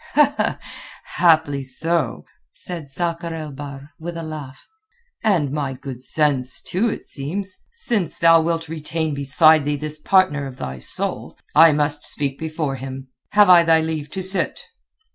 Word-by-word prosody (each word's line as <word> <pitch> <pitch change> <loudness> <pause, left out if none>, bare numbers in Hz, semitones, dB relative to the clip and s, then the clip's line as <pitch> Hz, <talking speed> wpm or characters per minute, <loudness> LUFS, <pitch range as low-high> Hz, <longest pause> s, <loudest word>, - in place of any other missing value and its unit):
"Haply 160 -5 +3
so," 165 +5 0 0.3
said 170 -6 -5
Sakr 170 +3 -3
el 155 -2 -6
Bahr, 140 +1 -9
with 170 +1 -6
a 165 - -5
laugh. 150 -4 -8 0.6
"And 175 -11 +2
my 140 -2 -2
good 130 -1 -8
sense, 135 -4 +2
too, 210 +6 -1
it - - -6
seems. 185 +8 -3 0.2
Since 235 - 0
thou 165 -1 +6
wilt 165 0 -2
retain 160 0 -3
beside 145 +3 +4
thee 145 +1 -1
this 155 +1 -4
partner 150 -6 +2
of 130 -1 -10
thy 65 - -6
soul, - - -3 0.2
I 160 +1 +7
must 150 0 0
speak 140 -2 -1
before 155 -3 -3
him. 130 0 -8 0.2
Have 205 0 +6
I 175 -1 +8
thy 165 -1 +4
leave 160 -2 -3
to 190 - -2
sit?" 190 +1 -2
155 Hz, 150 wpm, -21 LUFS, 140-165 Hz, 0.6 s, I